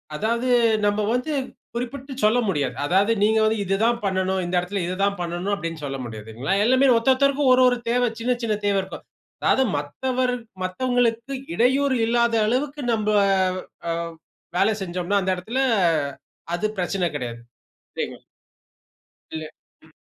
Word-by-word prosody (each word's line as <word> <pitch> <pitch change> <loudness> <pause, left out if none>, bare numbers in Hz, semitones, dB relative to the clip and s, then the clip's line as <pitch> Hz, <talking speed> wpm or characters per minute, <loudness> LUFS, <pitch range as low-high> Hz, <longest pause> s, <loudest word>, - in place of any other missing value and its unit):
அதாவது 230 +7 -1 0.4
நம்ம 205 +1 +1
வந்து 250 +6 -1 0.4
குறிப்பிட்டு 265 +3 -5
சொல்ல 220 +3 +4
முடியாது. 145 -8 0
அதாவது, 195 +7 +3
நீங்க 220 +1 +3
வந்து, 220 0 +2
"இது 195 - +1
தான் 235 +1 +2
பண்ணனும், 190 0 0
இந்த 175 - -2
இடத்துல 185 +2 -3
இத 180 +1 -3
தான் 200 0 +2
பண்ணனும்" 175 +4 -2
அப்படின்னு 165 -4 -5
சொல்ல 135 -1 -3
முடியாதுங்களா? 110 - -4
எல்லாமே 260 +3 +4
ஒருத்தொருத்தருக்கும், 270 +3 +3
ஒரு 255 - +4
ஒர 245 - +3
தேவை. 245 +1 +2
சின்ன 245 +2 +1
சின்ன 215 -2 +1
தேவை 200 -1 +2
இருக்கும். 190 - -9 0.4
அதாவது 265 - +3
மத்தவர் 250 - -1 0.3
மத்தவங்களுக்கு 245 +5 0 0.2
இடையூறு 260 +3 +3
இல்லாத 235 0 +2
அளவுக்கு, 280 +4 -1
நம்ப 215 -1 0 0.8
அ - - +1 0.7
வேலை 205 +4 +3
செஞ்சோம்னா 180 +2 -1
அந்த 190 0 +1
இடத்தில, 235 +9 -2 0.9
அது 215 +5 0
பிரச்சன 180 -1 0
கெடையாது. 120 -3 -5 0.6
சரிங்களா. - - -4 1.1
இல்ல. 155 0 -4 0.4
ம். - - -21
215 Hz, 140 wpm, -23 LUFS, 185-250 Hz, 1.1 s, சொல்ல